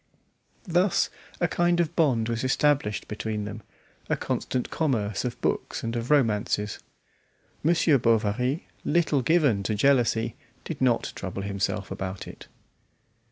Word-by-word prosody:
Thus 180 Hz, +1 st, +2 dB, 0.3 s
a 175 Hz, -, +2 dB
kind 175 Hz, +1 st, +2 dB
of 170 Hz, 0 st, 0 dB
bond 130 Hz, -9 st, +2 dB
was 115 Hz, 0 st, -2 dB
established 130 Hz, -5 st, +1 dB
between 105 Hz, 0 st, -3 dB
them, 105 Hz, +1 st, -6 dB, 0.5 s
a -, -, +1 dB
constant 125 Hz, -, -2 dB
commerce 110 Hz, -10 st, 0 dB
of 125 Hz, -2 st, -4 dB
books -, -, -1 dB
and 115 Hz, +1 st, -2 dB
of 115 Hz, +1 st, -3 dB
romances. 105 Hz, -6 st, +1 dB, 0.8 s
Monsieur 160 Hz, -3 st, +4 dB
Bovary, 115 Hz, +5 st, +1 dB, 0.2 s
little 160 Hz, -3 st, +2 dB
given 140 Hz, -8 st, +3 dB
to 105 Hz, +2 st, -1 dB
jealousy, 115 Hz, -2 st, +2 dB, 0.3 s
did 160 Hz, -5 st, -6 dB
not 125 Hz, -3 st, +2 dB
trouble 95 Hz, +1 st, -5 dB
himself 100 Hz, -1 st, -2 dB
about 95 Hz, 0 st, -5 dB
it. -, -, -11 dB
120 Hz, 130 wpm, -26 LUFS, 105-150 Hz, 0.8 s, Monsieur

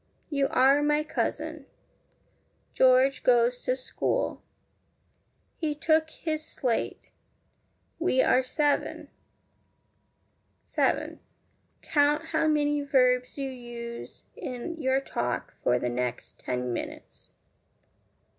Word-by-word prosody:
You 280 Hz, -2 st, +2 dB
are 270 Hz, +3 st, +4 dB
my 295 Hz, +1 st, +2 dB
cousin. 315 Hz, -, -3 dB, 1.1 s
George 260 Hz, +1 st, +4 dB
goes 245 Hz, 0 st, +3 dB
to 255 Hz, -, +2 dB
school. 265 Hz, -, -2 dB, 1.2 s
He 305 Hz, -3 st, -1 dB
took 315 Hz, +1 st, +2 dB
his 310 Hz, -1 st, -4 dB
slate. 250 Hz, -6 st, -3 dB, 0.9 s
We 325 Hz, -6 st, +3 dB
are 255 Hz, -, +4 dB
seven. 290 Hz, +3 st, -1 dB, 1.6 s
7. -, -, 0 dB, 0.6 s
Count 295 Hz, +1 st, +2 dB
how 315 Hz, 0 st, +1 dB
many 295 Hz, -1 st, +2 dB
verbs 250 Hz, -2 st, +2 dB
you 275 Hz, -1 st, -3 dB
use 240 Hz, -2 st, -8 dB
in 270 Hz, +6 st, -6 dB
your 265 Hz, 0 st, +2 dB
talk 125 Hz, -, -3 dB
for 125 Hz, -, +3 dB
the 125 Hz, -, -1 dB
next 125 Hz, 0 st, -4 dB
ten 125 Hz, -1 st, -2 dB
minutes. -, -, -7 dB
265 Hz, 100 wpm, -28 LUFS, 245-295 Hz, 1.6 s, are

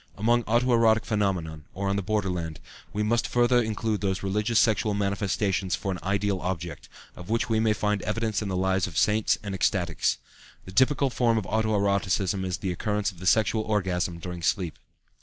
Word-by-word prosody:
Among 120 Hz, +3 st, +2 dB
auto 120 Hz, +3 st, +2 dB
erotic 115 Hz, -1 st, +4 dB
phenomena, 95 Hz, -7 st, -1 dB, 0.2 s
or 100 Hz, +1 st, -2 dB
on 100 Hz, -, +1 dB
the 100 Hz, -, 0 dB
borderland, 90 Hz, -6 st, -2 dB, 0.3 s
we 105 Hz, +4 st, -1 dB
must 115 Hz, +2 st, +1 dB
further 120 Hz, 0 st, +3 dB
include 110 Hz, -2 st, -2 dB
those 95 Hz, -1 st, -1 dB
religious 105 Hz, +4 st, 0 dB
sexual 110 Hz, -2 st, +3 dB
manifestations 100 Hz, -1 st, 0 dB
for 95 Hz, -, -3 dB
an 90 Hz, -, -4 dB
ideal 100 Hz, 0 st, 0 dB
object, 85 Hz, -3 st, -5 dB, 0.3 s
of 90 Hz, +2 st, -11 dB
which 115 Hz, +2 st, 0 dB
we 110 Hz, -1 st, +2 dB
may 110 Hz, -1 st, +3 dB
find 105 Hz, -1 st, -1 dB
evidence 110 Hz, 0 st, -1 dB
in 105 Hz, -, -3 dB
the 95 Hz, -1 st, -2 dB
lives 95 Hz, 0 st, +1 dB
of 85 Hz, -2 st, -7 dB
saints 105 Hz, +2 st, +3 dB
and 100 Hz, -2 st, -4 dB
ecstatics. 90 Hz, -3 st, 0 dB, 0.5 s
The 95 Hz, -, -9 dB
typical 135 Hz, +5 st, +3 dB
form 120 Hz, -2 st, +2 dB
of 105 Hz, -, -1 dB
auto 110 Hz, +2 st, 0 dB
erotism 100 Hz, -1 st, 0 dB
is 90 Hz, -2 st, -2 dB
the 95 Hz, +1 st, -3 dB
occurrence 105 Hz, +3 st, -1 dB
of 90 Hz, -, -17 dB
the 95 Hz, -, -4 dB
sexual 110 Hz, +2 st, +3 dB
orgasm 90 Hz, -5 st, -1 dB
during 90 Hz, 0 st, -7 dB
sleep. 85 Hz, +1 st, -1 dB
100 Hz, 190 wpm, -26 LUFS, 95-110 Hz, 0.5 s, erotic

